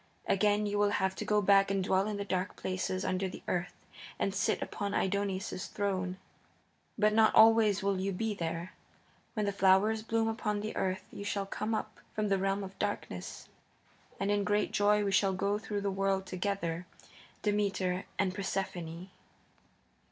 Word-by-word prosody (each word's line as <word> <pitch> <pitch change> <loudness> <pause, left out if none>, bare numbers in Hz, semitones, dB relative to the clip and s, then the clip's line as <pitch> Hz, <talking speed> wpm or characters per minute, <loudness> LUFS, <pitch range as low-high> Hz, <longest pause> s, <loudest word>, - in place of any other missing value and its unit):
Again 210 +1 +2
you 205 0 -1
will 205 0 +4
have 190 0 +1
to - - -3
go 210 -1 +2
back 195 0 +5
and 195 -1 +1
dwell 190 +1 +2
in 210 -1 -2
the 200 - -3
dark 185 0 -2
places 185 0 -2
under 185 +1 0
the - - -10
earth 180 0 -2 0.4
and 195 - 0
sit 195 - +1
upon 200 0 -3
Aidoneus's 195 -1 -1
throne. 185 -2 -2 0.8
But 210 0 +3
not 220 0 +5
always 220 -3 +6
you - - 0
will 195 0 0
be 215 +3 -1
there. 165 -1 -4 0.6
When 215 -2 0
the 200 - +1
flowers 200 +3 +4
bloom 225 0 0
upon 210 -2 -1
the 215 +1 -4
earth 185 0 -1
you - - -7
shall 200 -1 -2
come 215 +3 -2
up - - -5 0.2
from 215 -1 0
the 195 -1 +2
realm 195 +1 0
of 190 0 -9
darkness, - - -4 0.7
and 195 +1 0
in 205 0 +2
great 205 +1 +1
joy 205 0 +3
we 200 - 0
shall 195 0 +3
go 200 +2 0
through 210 -2 -3
the 200 0 -1
world 195 0 0
together, 185 -2 -2 0.6
Demeter 195 -3 0
and 190 -2 +1
Persephone." 185 -2 -4
200 Hz, 175 wpm, -31 LUFS, 190-205 Hz, 0.8 s, always